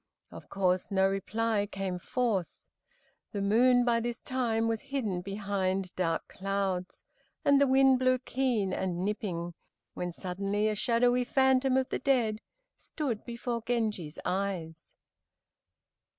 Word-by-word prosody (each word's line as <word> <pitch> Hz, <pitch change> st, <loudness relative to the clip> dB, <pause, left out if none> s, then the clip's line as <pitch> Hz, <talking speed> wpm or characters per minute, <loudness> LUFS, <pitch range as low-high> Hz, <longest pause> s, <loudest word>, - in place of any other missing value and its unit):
Of -, -, -11 dB
course 185 Hz, -2 st, +1 dB
no 190 Hz, -1 st, +3 dB
reply 205 Hz, +2 st, 0 dB
came 190 Hz, -2 st, -3 dB
forth. 215 Hz, -4 st, -1 dB, 0.8 s
The 205 Hz, -, -2 dB
moon 245 Hz, +4 st, +4 dB
by 235 Hz, -1 st, +3 dB
this 235 Hz, +1 st, -4 dB
time 230 Hz, -3 st, 0 dB
was 225 Hz, -1 st, -1 dB
hidden 220 Hz, -10 st, -2 dB
behind 195 Hz, -1 st, -2 dB
dark 165 Hz, -3 st, -1 dB
clouds, 195 Hz, -2 st, -3 dB, 0.4 s
and 280 Hz, 0 st, +5 dB
the 280 Hz, -, +5 dB
winds 265 Hz, 0 st, +5 dB
blew 255 Hz, 0 st, +3 dB
keen 245 Hz, -6 st, -1 dB
and 185 Hz, -1 st, -2 dB
nipping, 175 Hz, -5 st, -3 dB, 0.4 s
when 180 Hz, 0 st, -3 dB
suddenly 195 Hz, +4 st, -2 dB
a 215 Hz, -, +1 dB
shadowy 245 Hz, +3 st, +2 dB
phantom 265 Hz, 0 st, +3 dB
of 260 Hz, -1 st, 0 dB
the -, -, -2 dB
dead 235 Hz, -5 st, +1 dB, 0.3 s
stood 260 Hz, -9 st, -4 dB
before 235 Hz, 0 st, -3 dB
Genji's 215 Hz, -9 st, -2 dB
eyes. 180 Hz, -4 st, -3 dB
215 Hz, 130 wpm, -30 LUFS, 190-245 Hz, 0.8 s, and